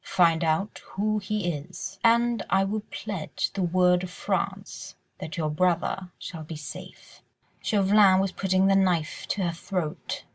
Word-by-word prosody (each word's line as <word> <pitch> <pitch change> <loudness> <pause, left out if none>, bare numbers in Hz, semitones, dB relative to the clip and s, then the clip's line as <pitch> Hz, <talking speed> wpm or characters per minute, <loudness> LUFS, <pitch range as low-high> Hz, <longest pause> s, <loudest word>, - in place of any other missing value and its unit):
Find 170 -2 +4
out 165 +6 0
who 215 +2 0
he 205 -3 -1
is, 180 +6 -7
and 235 0 +4
I 195 - +4
will 210 +2 -1
pledge 195 -6 -3
the 195 - -2
word 180 0 +3
of 185 - -5
France 180 - -3 0.2
that 160 - -6
your 155 -2 0
brother 180 +3 0
shall 165 -3 -7
be 155 +1 -7
safe." 150 0 -10 0.4
Chauvelin 200 -2 +5
was 195 -1 +1
putting 190 0 +1
the 195 0 +4
knife 180 -5 +1
to 200 - -1
her 175 - +1
throat. 170 -2 -4
185 Hz, 155 wpm, -26 LUFS, 170-195 Hz, 0.4 s, Chauvelin